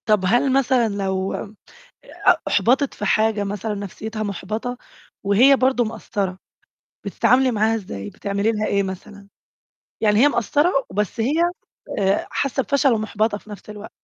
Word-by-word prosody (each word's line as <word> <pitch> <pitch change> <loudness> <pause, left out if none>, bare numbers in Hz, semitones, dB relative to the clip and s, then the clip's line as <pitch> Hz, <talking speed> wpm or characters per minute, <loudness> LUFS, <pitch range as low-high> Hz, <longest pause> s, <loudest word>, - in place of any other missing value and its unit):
طَب 210 -3 +3
هل 245 +7 +2
مثلًا 260 -3 +3
لو 190 -1 -2
م 210 +1 -6 0.7
أ - - +7
أُحبَطت 270 +3 +2
في - - -5
حاجة 215 -1 +2
مثلًا 205 +2 -3
نَفْسيتها 215 +2 -6
مُحبَطة 215 +5 -4 0.5
وهي 240 +8 +5
برضه 260 -2 +2
مقصّرة، 205 -4 -4 0.7
بتتعاملي 245 +6 +3
معاها 220 0 +1
إزاي، 100 - -6
بتعملي 200 +2 -1
لها 215 -1 -1
إيه 200 0 +1
مثلًا، 200 +1 -8 0.7
يعني 210 -1 +3
هي 290 - +7
مقصّرة 290 - +1 0.2
وبس 210 +3 -2
هي 240 +6 +1 0.7
آآ، 195 0 +1
حاسّة 270 -1 -1
بفَشل 280 -1 +2
ومُحبَطة 215 -1 -1
في 215 - -18
نُفْس 210 0 -10
الوقت؟ 210 +1 -9
215 Hz, 145 wpm, -21 LUFS, 200-240 Hz, 0.7 s, أ